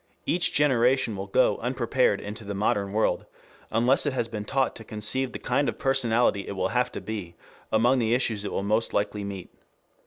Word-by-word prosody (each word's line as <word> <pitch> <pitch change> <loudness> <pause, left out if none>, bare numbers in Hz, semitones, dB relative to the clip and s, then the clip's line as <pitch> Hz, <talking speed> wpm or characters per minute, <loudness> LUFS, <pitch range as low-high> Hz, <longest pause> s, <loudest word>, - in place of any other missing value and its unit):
Each 175 0 +2
generation 130 -4 +3
will 95 +1 -5
go 115 +6 +2
unprepared 125 -3 +1
into 105 +2 -7
the 100 0 -5
modern 100 0 0
world, 110 +2 0 0.4
unless 120 +6 +2
it 145 - 0
has 120 -3 -1
been 105 -3 -6
taught 135 +4 0
to 110 - -10
conceive 110 +5 -1
the - - -5
kind 140 +4 0
of - - -5
personality 120 -6 +2
it - - -4
will 95 -1 -1
have 125 +1 0
to - - -4
be 100 -6 -6 0.4
among 120 +4 +3
the 115 0 +2
issues 115 -5 -1
it 105 - -4
will - - -2
most 110 +3 0
likely 105 0 -1
meet. 100 -2 -7
115 Hz, 195 wpm, -26 LUFS, 105-125 Hz, 0.4 s, generation